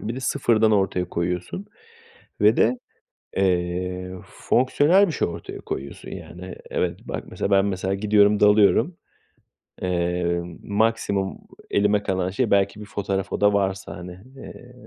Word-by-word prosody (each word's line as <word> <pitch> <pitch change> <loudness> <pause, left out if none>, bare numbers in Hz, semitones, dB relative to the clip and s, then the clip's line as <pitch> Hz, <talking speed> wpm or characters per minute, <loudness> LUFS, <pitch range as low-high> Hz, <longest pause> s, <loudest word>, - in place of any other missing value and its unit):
Bir 115 - -4
de 130 - -5
sıfırdan 115 -4 +2
ortaya 95 -3 +1
koyuyorsun 90 - -3 0.7
ve 105 +2 +5
de, 125 +3 +3 0.6
eee, 90 0 -1
fonksiyonel 145 +10 +3
bir - - -2
şey - - 0
ortaya 85 - -7
koyuyorsun, 70 +1 -6
yani, 90 +2 -9
evet - - -1
bak, - - -4
mesela, - - -3
ben, 100 0 +5
mesela, 95 -1 -1
gidiyorum 105 0 +3
dalıyorum, 105 - +4 0.8
eee, 85 -1 0 0.2
maksimum 100 -2 0 0.3
elime 105 0 +2
kalan 95 -2 -1
şey 115 +4 -1
belki 100 +1 +2
bir - - -7
fotoğraf, 100 -2 -3
o - - -3
da 105 0 +5
varsa, 95 -2 -1
hani. 90 0 -8 0.3
Eee, 125 -1 -11
100 Hz, 135 wpm, -23 LUFS, 90-110 Hz, 0.8 s, ve